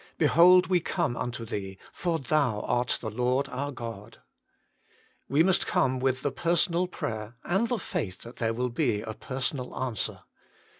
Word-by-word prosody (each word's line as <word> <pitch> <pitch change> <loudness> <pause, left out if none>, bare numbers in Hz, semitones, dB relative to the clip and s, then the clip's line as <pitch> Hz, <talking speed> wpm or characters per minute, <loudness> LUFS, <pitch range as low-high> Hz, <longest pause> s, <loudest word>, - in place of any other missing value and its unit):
Behold, 180 +2 +6
we 185 -1 +3
come 170 -6 -1
unto 120 -2 -4
Thee, 95 -3 -5 0.2
for 170 -2 -1
Thou 135 -6 +1
art 120 0 +1
the 110 - -4
Lord 125 +4 +1
our 140 +2 -3
God." 115 -4 -8 1.1
We 145 +4 +4
must 185 0 +3
come 130 -1 +2
with 130 0 0
the 145 - 0
personal 170 +3 +1
prayer, 110 -9 -5
and 195 +7 +1
the 245 - +1
faith 95 - -4
that 120 +2 -11
there 115 -1 0
will 125 +1 0
be 120 -5 0
a 110 0 -5
personal 130 +1 -4
answer. 125 -6 -2
130 Hz, 160 wpm, -28 LUFS, 115-165 Hz, 1.1 s, Behold